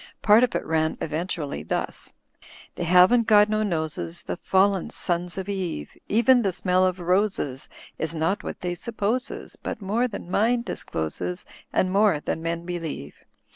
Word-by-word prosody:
Part 215 Hz, +3 st, +6 dB
of 250 Hz, -, +1 dB
it -, -, -1 dB
ran 160 Hz, 0 st, 0 dB
eventually 155 Hz, -, -3 dB
thus: 80 Hz, -, -4 dB, 0.3 s
— -, -, -19 dB, 0.2 s
'*They 175 Hz, -, -4 dB
haven't 185 Hz, +7 st, +5 dB
got 210 Hz, -1 st, +6 dB
no 215 Hz, 0 st, +1 dB
noses 165 Hz, -2 st, -2 dB
The -, -, -3 dB
fallen 190 Hz, +1 st, +2 dB
sons 175 Hz, +1 st, -2 dB
of 190 Hz, 0 st, -4 dB
Eve, 185 Hz, -, -4 dB
Even 240 Hz, +4 st, +4 dB
the 195 Hz, -4 st, +1 dB
smell 185 Hz, +1 st, +2 dB
of 185 Hz, 0 st, -2 dB
roses 180 Hz, -7 st, 0 dB, 0.3 s
Is 160 Hz, +1 st, -2 dB
not 165 Hz, +6 st, 0 dB
what -, -, -6 dB
they 180 Hz, -1 st, -2 dB
supposes. 225 Hz, +6 st, -3 dB
But -, -, -4 dB
more 220 Hz, +5 st, 0 dB
than 200 Hz, -6 st, -8 dB
mind 235 Hz, +4 st, +2 dB
discloses. 90 Hz, -, -4 dB, 0.3 s
And 185 Hz, -, +1 dB
more 200 Hz, -5 st, +4 dB
than 160 Hz, -, -3 dB
men 170 Hz, +1 st, -3 dB
believe. 165 Hz, -, -5 dB
180 Hz, 165 wpm, -25 LUFS, 165-210 Hz, 0.3 s, Part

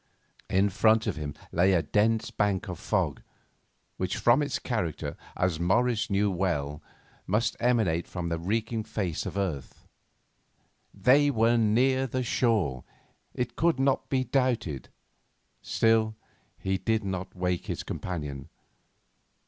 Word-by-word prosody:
In 95 Hz, +2 st, +3 dB
front 110 Hz, +3 st, +3 dB
of -, -, -1 dB
him 75 Hz, -2 st, -5 dB, 0.2 s
lay 95 Hz, +3 st, +3 dB
a 85 Hz, -3 st, +3 dB
dense 110 Hz, +3 st, +1 dB
bank 100 Hz, -1 st, 0 dB
of 90 Hz, -4 st, -6 dB
fog, -, -, -1 dB, 0.8 s
which, 95 Hz, -1 st, -2 dB
from 120 Hz, +5 st, +4 dB
its 145 Hz, -2 st, -1 dB
character, 80 Hz, -, -3 dB, 0.2 s
as 90 Hz, -3 st, 0 dB
Morris 120 Hz, +6 st, +1 dB
knew 100 Hz, 0 st, +2 dB
well, 75 Hz, -6 st, -1 dB, 0.5 s
must 105 Hz, +4 st, +1 dB
emanate 110 Hz, -9 st, +1 dB
from 90 Hz, -2 st, -4 dB
the 85 Hz, 0 st, -2 dB
reeking 110 Hz, +5 st, -1 dB
face 105 Hz, -7 st, -3 dB
of -, -, -5 dB
earth. 80 Hz, -10 st, -4 dB, 1.0 s
They 130 Hz, +9 st, +4 dB
were 115 Hz, -2 st, +3 dB
near 125 Hz, +4 st, +3 dB, 0.2 s
shore, 105 Hz, -, +1 dB, 0.5 s
it 120 Hz, -1 st, -3 dB
could 165 Hz, -4 st, +2 dB
not 135 Hz, 0 st, +1 dB
be 130 Hz, -1 st, +1 dB
doubted; 120 Hz, -, -1 dB, 0.7 s
still, 110 Hz, -1 st, +2 dB, 0.4 s
he 95 Hz, 0 st, -1 dB
did 110 Hz, -1 st, 0 dB
not 95 Hz, -1 st, -4 dB
wake 90 Hz, -1 st, -1 dB
his -, -, -3 dB
companion. 75 Hz, -6 st, -5 dB
105 Hz, 130 wpm, -28 LUFS, 90-120 Hz, 1.0 s, from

